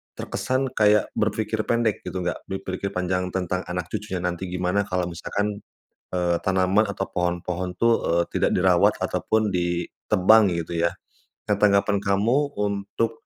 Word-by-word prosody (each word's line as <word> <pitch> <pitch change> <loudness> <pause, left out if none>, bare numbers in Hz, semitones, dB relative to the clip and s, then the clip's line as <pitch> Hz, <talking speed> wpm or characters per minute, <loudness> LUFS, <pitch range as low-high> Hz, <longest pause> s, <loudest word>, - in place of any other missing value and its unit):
terkesan 130 +1 -2
kayak 105 -1 +4
berpikir 110 +1 -1
pendek, 115 -3 0
gitu, 95 - -4
nggak 90 - -3
berpikir 95 0 -4
panjang 90 0 -1
tentang 95 0 -2
anak 90 -1 -4
cucunya 105 -4 -4
nanti 90 +1 -2
gimana 90 +3 0
kalau 90 -1 -1
misalkan, 100 +4 -3 0.5
eee, 90 -1 +1
tanaman 95 +2 +3
atau 95 -1 -2
pohon-pohon, 90 +1 -2
tuh, 115 0 +4
eee, 85 +1 +2
tidak - - +2
dirawat - - +4
atau - - -1
pun 110 -1 +2
ditebang, 90 +4 +3
gitu, 85 0 -3
ya. 85 - +2 0.6
Nah, - - +4
tanggapan 100 0 +3
kamu 115 +9 +1
untuk, 105 +3 -2
95 Hz, 145 wpm, -24 LUFS, 90-105 Hz, 0.6 s, kayak